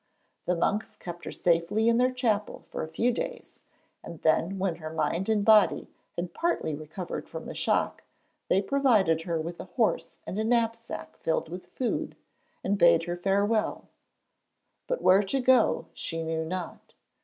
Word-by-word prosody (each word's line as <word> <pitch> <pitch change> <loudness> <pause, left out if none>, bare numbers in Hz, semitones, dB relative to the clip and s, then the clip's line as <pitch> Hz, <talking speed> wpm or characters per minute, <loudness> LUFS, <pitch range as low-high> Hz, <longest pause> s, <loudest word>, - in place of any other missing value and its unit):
The 180 - +2
monks 205 +5 -1
kept 175 -1 -8
her - - -5
safely 175 +6 +1
in 230 0 +4
their 250 +1 +4
chapel 225 -5 -1
for - - -4
a - - -3
few 225 +10 +1
days, - - -5 0.4
and 170 - -9
then, 165 +4 +2
when 185 -3 -1
her 155 -2 -6
mind 160 +5 -1
and 210 -2 +2
body 215 -2 +5 0.2
had 175 0 -4
partly 335 - -1
recovered 155 +4 -6
from - - -7
the - - -6
shock, - - 0 0.4
they 195 +2 +2
provided 210 - +3
her 165 -1 -2
with 170 +2 -5
a - - -6
horse 230 -4 -1
and 195 - -4
a - - +1
knapsack 230 0 -1
filled 160 0 -1
with 180 +2 -8
food, 250 -3 -3 0.5
and 200 +1 0
bade 170 -1 +6
her 175 +1 -3
farewell. 200 +4 0 1.0
But - - -2
where 190 +2 +6
to 205 +7 -1
go 255 -2 +4
she 165 -1 -3
knew 160 0 -2
not. 180 +1 -6
195 Hz, 165 wpm, -28 LUFS, 170-225 Hz, 1.0 s, bade